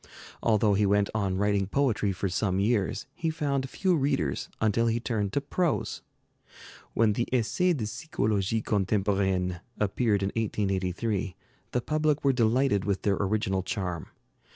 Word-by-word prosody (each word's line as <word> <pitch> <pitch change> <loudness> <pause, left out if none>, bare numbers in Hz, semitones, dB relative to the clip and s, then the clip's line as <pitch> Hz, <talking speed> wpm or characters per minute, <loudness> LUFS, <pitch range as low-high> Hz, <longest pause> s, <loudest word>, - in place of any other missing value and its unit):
Although 105 -2 +3
he 100 +1 +3
went 100 0 +2
on 100 -3 0
writing 100 -1 +1
poetry 110 -4 +1
for 95 +1 -2
some 95 +1 0
years, 105 -1 0
he 165 -2 -2
found 140 -4 -1
few 185 +3 +1
readers 135 - 0
until 110 +2 +2
he 115 +1 +1
turned 110 -5 -1
to 140 - +1
prose. 165 +3 -1 0.9
When 110 -2 +4
the 120 +3 -1
'Essais 130 - +2
de 110 - -2
Psychologie 105 - -1
Contemporaine' 95 -3 0 0.2
appeared 105 0 +1
in 95 - +1
1883, 100 -1 -1 0.4
the 125 - 0
public 155 +1 0
were 135 -1 +4
delighted 120 -2 +2
with 100 -1 -1
their 100 -2 +2
original 100 -1 0
charm. 90 -4 -3
105 Hz, 145 wpm, -28 LUFS, 95-125 Hz, 0.9 s, When